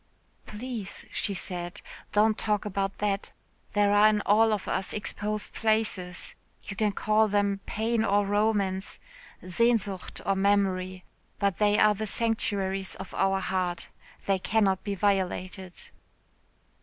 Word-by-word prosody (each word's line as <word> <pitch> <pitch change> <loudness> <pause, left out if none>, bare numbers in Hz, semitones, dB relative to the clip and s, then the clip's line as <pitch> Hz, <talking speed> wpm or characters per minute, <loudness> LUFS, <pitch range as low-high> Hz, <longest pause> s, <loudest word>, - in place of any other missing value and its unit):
"Please," 220 -2 -6
she 200 - -1
said, 180 +1 -4 0.3
"don't 215 +1 +4
talk 210 -1 -1
about 195 -1 -2
that. 200 -1 -1 0.4
There 205 0 +3
are 205 +1 +7
in 210 -1 +2
all 220 +2 +4
of 210 -3 -2
us 190 - -1
exposed 210 0 -3
places 215 -5 -1 0.3
you 200 - -7
can 210 0 +1
call 215 +2 +2
them 200 -1 +1
pain 220 +1 0
or 205 -1 +2
romance 200 -2 0 0.5
Sehnsucht 205 -1 +1
or 195 - +2
memory 190 -2 +1 0.3
but 200 -3 0
they 210 0 +4
are 215 0 +5
the 215 +1 -4
sanctuaries 200 -4 -1
of 190 0 -9
our 195 0 +2
hearts 180 -3 -2 0.4
they 195 -1 +2
cannot 195 -2 +1
be 200 -1 -2
violated." 185 -1 -2
200 Hz, 130 wpm, -28 LUFS, 190-215 Hz, 0.5 s, are